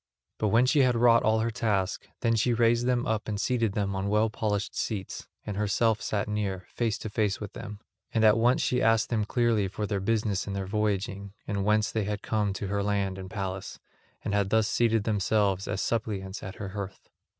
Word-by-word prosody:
But 110 - +1
when 115 +4 +4
she 135 +3 +3
had 130 -3 +4
wrought 115 0 +5
all 110 +1 +2
her 115 +1 0
task, 105 -5 -1
then 115 -1 +2
she 120 +2 +2
raised 120 +1 +3
them 125 -1 +1
up 110 -1 -1
and 105 -2 -2
seated 115 -2 +1
them 100 -1 -1
on 95 +1 -1
well 105 +1 +2
polished 105 -2 -2
seats, 100 -4 -4 0.2
and 105 - -4
herself 105 +2 +1
sat 105 0 -1
near, 100 -3 -2
face 115 -3 0
to 110 - -6
face 105 -2 0
with 105 -2 -7
them. 105 0 -8 0.3
And 110 - +1
at 110 -1 +7
once 120 +3 +3
she 125 0 +1
asked 115 -1 +3
them 110 -3 0
clearly 115 -3 +2
of 105 +2 -3
their 100 -2 0
business 105 -1 0
and 100 - -3
their 100 -1 -2
voyaging, 100 -1 -2
and 100 -2 -1
whence 105 0 +2
they 110 -2 -1
had 105 0 -3
come 105 -2 0
to 100 - -4
her 100 +1 -1
land 100 -2 -1
and 95 -1 -7
palace, 95 -2 -5 0.5
and - - -2
had 100 -1 +1
thus 110 0 +3
seated 115 -1 +2
themselves 100 -2 +1
as 95 - -1
suppliants 105 -4 -2
at 95 - -7
her 100 -2 -6
hearth. 100 0 -7
105 Hz, 215 wpm, -28 LUFS, 100-115 Hz, 0.5 s, at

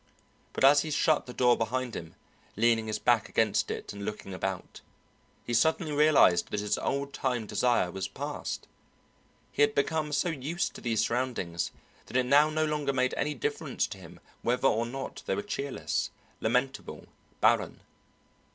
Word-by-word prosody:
But - - -2
as 140 +2 +7
he 160 - -4
shut 155 0 +2
the - - -6
door 125 -1 +4
behind 125 +1 -2
him, 80 -1 -7 0.4
leaning 115 0 +2
his 110 - -1
back 120 -3 +2
against 110 -2 +1
it - - -5
and 100 0 -7
looking 100 -1 -5
about, 95 0 -4 0.6
he 120 - -3
suddenly 160 +6 +2
realized 150 - +5
that 105 - -2
his 105 0 0
old 140 0 -2
time 125 -4 -1
desire 120 -5 +1
was 95 0 -3
passed; - - -5 0.8
he - - -2
had 145 0 +4
become 150 +1 0
so 145 +4 +1
used 160 +3 -2
to - - -10
these 115 -3 +1
surroundings 115 -9 -2 0.4
that - - -1
it 130 - +2
now 145 +4 +5
no 155 0 +1
longer 150 -2 -1
made 130 -1 +1
any 150 0 -1
difference 125 - -2
to - - -8
him - - -13 0.2
whether 125 +3 +2
or 115 0 +1
not 135 +2 -6
they - - +1
were 205 - -3
cheerless, 140 -9 -2 0.3
lamentable, 125 +4 -1 0.3
barren. - - +2
125 Hz, 170 wpm, -29 LUFS, 110-145 Hz, 0.8 s, as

